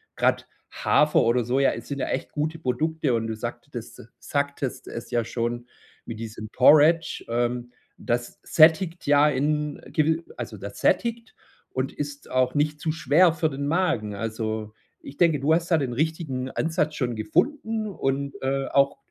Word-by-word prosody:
grad - - +1 0.2
Hafer 150 0 +3
oder 120 +1 +2
Soja, 135 +4 +2
e - - -5
sind 140 -1 -6
ja - - -1
echt - - -3
gute 155 +2 -2
Produkte 155 +1 0
und 115 -1 0
du 110 - -3
sagtetes 120 +1 -7 0.2
sagtest 140 -2 -3
es 115 - -7
ja 120 -1 +1
schon 120 +1 -3 0.4
wie 115 - -6
diesem 110 -1 -7
Porridge. 155 +5 +5
Ähm, 120 +1 -1 0.3
das 120 0 -3
sättigt 165 +2 +4
ja 145 +1 +5
in 150 +1 -1
gewi 160 +2 +2
also - - -6
das - - -8
sättigt 235 -1 0 0.3
und 130 0 -3
ist 145 -1 -6
auch 130 +1 +1
nicht 150 +1 0
zu 160 0 -1
schwer 160 +3 +4
für 160 -2 0
den 140 0 -4
Magen. 145 - 0
Also, 110 0 -4 0.3
ich 140 - -11
denke, 165 -4 +3
du 145 +4 +2
hast 170 +2 0
da 165 - +5
den 130 -5 -2
richtigen 145 -3 -2
Ansatz 155 -2 -1
schon 120 -3 -2
gefunden 220 - 0
und, 140 -6 -2
äh, 135 +1 0
auch 140 0 +2
140 Hz, 165 wpm, -25 LUFS, 120-160 Hz, 0.4 s, Porridge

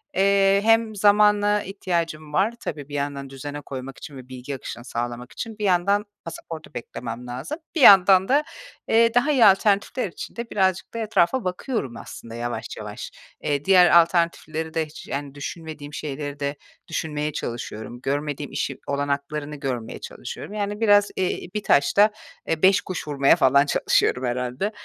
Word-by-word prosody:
eee, 195 0 +4
hem 225 0 +3
zamana 210 0 +4
ihtiyacım 170 -5 -3
var, 195 +8 +2
tabii, 145 - -6
bir - - -10
yandan 140 -1 -3
düzene 145 +2 -7
koymak 135 -1 -8
için 145 - -10
ve 130 -1 -12
bilgi 130 +2 -6
akışını 120 -2 -8
sağlamak 120 +1 -5
için. 225 -2 -7
Bir 210 - -5
yandan 200 +3 +2 0.2
pasaportu 165 -1 -8
beklemem 120 0 -7
lazım, 130 - -5 0.2
bir 320 - 0
yandan 190 -3 +8
da, 285 +3 +3 0.4
eee, 230 0 +4
daha 245 +5 +3
iyi 255 -6 +5
alternatifler 200 +4 +3
için 170 - -9
de 235 0 -6
birazcık 190 -3 0
da 230 - -4
etrafa 225 +2 +1
bakıyorum 185 - -3
aslında 115 0 -10
yavaş 120 0 -4
yavaş. - - -7 0.3
Eee, 145 -1 -1
diğer 180 -3 +7
alternatifleri 165 -2 -1
de 160 -1 0
hiç, 155 - -12
yani, 140 0 -5
düşünmediğim 150 -1 -7
şeyleri 145 -1 -5
de 140 0 -2 0.3
düşünmeye 150 -1 -3
çalışıyorum. 120 -1 -6
Görmediğim 145 0 -3
işi 135 - -3
olanaklarını 145 +1 -2
görmeye 130 -5 -4
çalışıyorum. 175 - -8
Yani, 205 0 -3
biraz, 205 -2 +4
eee, 185 -1 -2
1 210 -1 -3
taşta, 200 +8 +4 0.4
eee, 165 -1 -1
5 195 +2 +6
kuş 185 -5 -6
vurmaya 140 -2 +4
falan 140 +2 +4
çalışıyorum 130 -2 +1
herhâlde. 125 - -2
160 Hz, 155 wpm, -23 LUFS, 140-200 Hz, 0.4 s, yandan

